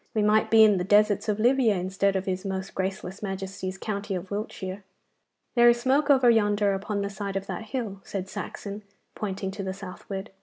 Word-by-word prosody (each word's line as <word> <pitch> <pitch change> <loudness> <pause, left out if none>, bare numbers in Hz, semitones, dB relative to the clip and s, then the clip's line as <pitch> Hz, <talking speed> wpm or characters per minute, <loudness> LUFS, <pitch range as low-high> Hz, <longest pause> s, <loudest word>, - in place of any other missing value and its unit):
We 215 - +2
might 210 +1 +3
be 225 -1 +7
in 210 -2 +5
the 180 - -1
deserts 205 +2 +3
of 210 0 0
Libya 240 -2 +4
instead 190 +2 0
of 190 0 -1
his 185 0 -2
most 190 -1 -4
graceless 190 0 -4
Majesty's 190 -1 -4
county 200 -1 -3
of 185 +2 -6
Wiltshire.' 200 -1 -5 0.7
'There 240 -1 +6
is 240 0 +3
smoke 275 +4 +2
over 265 -3 +5
yonder, 205 -2 +2
upon 200 +1 -2
the 200 - -2
side 200 -1 -5
of 195 0 -2
that 220 - -5
hill,' 215 -5 -4
said 190 -2 -5
Saxon, 200 +2 -6 0.3
pointing 195 -2 -4
to 200 +1 -6
the 190 -1 -4
southward. 195 +1 -7
200 Hz, 195 wpm, -26 LUFS, 190-215 Hz, 0.7 s, be